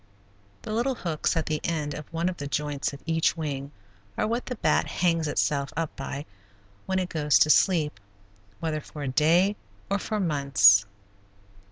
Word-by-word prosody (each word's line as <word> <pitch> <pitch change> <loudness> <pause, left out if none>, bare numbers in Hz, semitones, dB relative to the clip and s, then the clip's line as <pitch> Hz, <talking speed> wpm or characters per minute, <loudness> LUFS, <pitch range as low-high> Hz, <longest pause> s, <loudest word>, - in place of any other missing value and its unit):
The 215 - -5
little 245 +4 0
hooks 165 -3 -1
at 160 - 0
the 155 -1 -2
end 150 -3 -2
of 150 +2 -9
one 165 +1 -1
of 185 -1 -2
the 140 - -5
joints 145 -1 -2
of 140 - -11
each 165 0 +1
wing 140 -3 -4 0.5
are - - +1
what 235 +3 -2
the 250 - -3
bat - - +1
hangs 165 -3 +1
itself 140 -1 0
up 165 -2 -2
by 140 +1 -5 0.6
when 190 - 0
it 185 -1 0
goes 150 -2 +3
to 155 - +5
sleep, 155 - +3 0.6
whether 155 -2 -2
for 150 0 -9
a - - -3
day 165 +9 +3 0.4
or 200 - +2
for 215 +2 -3
months. 135 - +5
155 Hz, 175 wpm, -26 LUFS, 145-175 Hz, 0.6 s, to